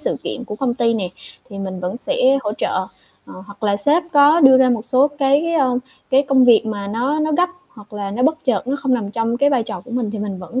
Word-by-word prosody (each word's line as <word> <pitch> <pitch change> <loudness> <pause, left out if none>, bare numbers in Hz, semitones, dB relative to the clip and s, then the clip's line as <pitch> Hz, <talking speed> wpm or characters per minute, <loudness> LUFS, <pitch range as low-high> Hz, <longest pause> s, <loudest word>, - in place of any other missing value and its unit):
sự - - -2
kiện 250 - -5
của 210 - -7
công 245 -1 -1
ty 235 -2 +1
này, 190 -5 -3 0.4
thì 200 - -8
mình 190 -2 -5
vẫn 180 +4 -4
sẽ 260 +2 +1
hỗ 210 - -2
trợ. 185 - -1 0.4
Ờ, 185 - -11
hoặc 205 0 -15
là 205 -1 +1
sếp 290 - +2
có 295 +3 +5
đưa 265 -3 +7
ra 260 -1 +4
một 230 -2 -1
số 270 +2 +3
cái, 290 +3 +1
ơ, 255 -5 +1 0.3
cái 270 +1 +4
công 270 -2 +3
việc 230 -2 +5
mà 205 -2 -4
nó 245 +9 -1
nó 310 0 -1
gấp 360 +1 +2 0.2
hoặc 210 -2 -17
là 205 -1 -5
nó 225 +5 -3
bất 315 +3 0
chợt, 240 -5 0
nó 275 - 0
không 265 -2 +1
nằm 215 -5 -3
trong 230 +2 -2
cái 280 +3 +2
vai 260 -4 +1
trò 190 - -7
của - - -14
mình 235 -3 -2
thì 215 - -6
mình 200 -2 -5
vẫn 210 +8 -5
245 Hz, 265 wpm, -19 LUFS, 210-275 Hz, 0.4 s, đưa